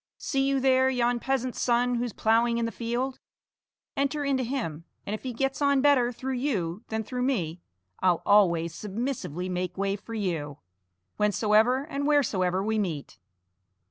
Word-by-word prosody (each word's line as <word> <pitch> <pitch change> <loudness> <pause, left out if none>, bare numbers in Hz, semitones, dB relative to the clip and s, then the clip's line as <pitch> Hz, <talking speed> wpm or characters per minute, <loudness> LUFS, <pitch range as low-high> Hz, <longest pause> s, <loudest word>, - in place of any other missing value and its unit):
See 270 -1 0
you 275 -1 +2
there 260 0 +4
yon 245 -1 +1
peasant's 255 -1 -2
son 245 0 +2
who's 240 0 -1
ploughing 230 +3 +2
in 235 - 0
the 230 - -2
field? 245 +3 -3 0.8
Enter 285 +1 0
into 270 -2 +1
him, 230 - -3 0.2
and 205 - -3
if 215 - -4
he 260 - -4
gets 270 +4 -2
on 280 -1 +3
better 265 -4 +4
through 260 +2 -4
you 215 - -2
than 220 0 -2
through 250 +3 -4
me, 180 - -1 0.4
I'll 180 -2 +2
always 170 -5 +4
submissively 205 - -4
make 180 0 -3
way 195 0 0
for 225 +3 -8
you, 165 -9 -2 0.6
whensoever 215 +5 +3
and 285 -1 -3
wheresoever 190 -11 +2
we 220 +1 0
meet." 160 - -4
235 Hz, 160 wpm, -27 LUFS, 195-265 Hz, 0.8 s, there